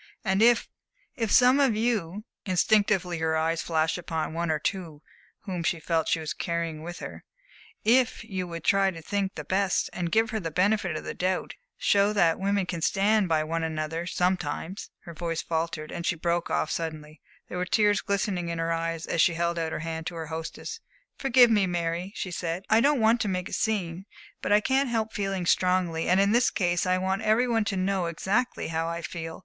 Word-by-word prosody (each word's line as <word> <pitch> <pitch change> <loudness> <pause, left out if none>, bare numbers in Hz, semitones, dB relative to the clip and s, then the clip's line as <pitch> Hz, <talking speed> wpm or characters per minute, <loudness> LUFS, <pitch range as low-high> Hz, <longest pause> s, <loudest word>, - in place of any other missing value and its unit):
And 190 +1 +2
if 235 0 +5 0.5
if 225 -6 -1
some 255 +2 +6
of 265 -6 +3
you" 215 -4 -1 0.2
instinctively 185 -2 +2
her 160 0 +1
eyes 160 +1 0
fastened 160 +1 0
upon 160 -2 -3
one 170 0 -2
or 155 - +2
two 160 -2 -4 0.4
whom 185 -4 -4
she 165 0 0
felt 160 0 0
she - - +1
was 155 -1 -4
carrying 170 -2 -3
with 175 +2 -7
her - - -8 0.6
"if 245 +2 +3
you 185 -2 -4
would 170 -1 -7
try 195 -1 +3
to 170 -3 -7
think 200 +1 -2
the - - -5
best, 195 0 0 0.2
give 225 +3 +2
her 220 - -1
the 165 -5 -3
benefit 185 0 +1
of - - -7
the - - -5
doubt, 185 0 -1 0.2
show 200 +1 +3
that 170 -6 +3
women 200 0 +1
can 175 -2 -4
stand 200 +2 +2
by 155 -1 +2
one 165 +1 -2
another 160 +1 -3
sometimes" 180 0 -2
Her 170 - -10
voice 165 0 -3
faltered 160 -1 -3
and 170 - -5
she 175 - 0
broke 170 +1 -1
off 155 - 0
suddenly; 155 -2 -5 0.3
there 180 - -5
were 180 - 0
tears 205 +1 +3
glistening 190 -3 -1
in 170 - -3
her 165 0 0
eyes 165 0 -2
as 165 - +1
she 170 - +3
held 170 0 0
out 160 -1 -2
her - - -3
hand 160 0 -4
to 175 - -5
her 165 -1 -4
hostess. 165 - -6 0.4
"Forgive 255 -3 +5
me, 205 -3 +3
Mary," 175 +1 -2
she 185 - -4
said. 175 +1 -3
"I 220 +1 +6
don't 285 +1 +3
want 225 +2 +4
to 215 - 0
make 185 -2 -2
a - - -9
scene. 190 -4 -1 0.3
But - - -2
I 210 +1 +6
can't 265 +3 +1
help 220 -2 -1
feeling 195 -3 -2
strongly, 180 -2 +1
and 185 +2 +4
in 200 +1 +3
this 240 +3 +4
case 175 -1 0
I 185 0 +3
want 190 +2 -1
every 220 +3 +3
one 225 -3 +1
to 200 -2 -1
know 185 -1 0
exactly 200 +9 -1
how 165 0 -1
I 170 0 -4
feel." 165 -1 -6
180 Hz, 210 wpm, -27 LUFS, 165-205 Hz, 0.6 s, some